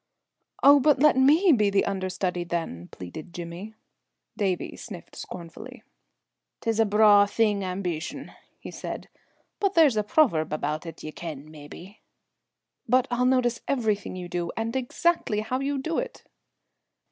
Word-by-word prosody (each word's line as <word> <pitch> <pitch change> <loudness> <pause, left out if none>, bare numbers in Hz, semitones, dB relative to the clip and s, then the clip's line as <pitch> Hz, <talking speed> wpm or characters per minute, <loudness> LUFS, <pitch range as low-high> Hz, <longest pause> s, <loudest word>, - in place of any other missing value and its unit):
"Oh, 285 +1 +8
but 295 +1 +4
let 300 +2 +5
me 305 +8 +5
be 210 -7 +3
the 200 0 +2
under 190 -1 -2
study, 180 -1 -2
then," 165 - -4
pleaded 95 - -10
Jimmy. 175 +5 -7 0.6
Davie 190 -4 -2
sniffed 190 -7 -10
scornfully. 185 +9 -9 0.8
"'Tis 225 -2 -1
a 225 - +5
braw 205 -1 +6
thing, 205 -2 +1
ambeetion," 180 -3 -4 0.3
he - - -9
said, - - -7 0.5
"but 395 -1 0
there's 300 -9 +5
a - - +3
proverb 205 - +2
about 155 +2 -3
it 165 - -9
ye 155 - -6
ken, 155 -2 -8
mebbe." 160 +6 -12 0.9
"But 255 +2 +3
I'll 245 +1 +1
notice 250 -2 +1
everything 220 -8 -1
you 180 -1 -6
do, 175 -1 -3
and 225 +1 -2
exactly 260 -3 0
how 250 +4 -2
you 280 +1 -1
do 320 +5 -2
it!" - - -6
205 Hz, 145 wpm, -26 LUFS, 175-255 Hz, 0.9 s, Oh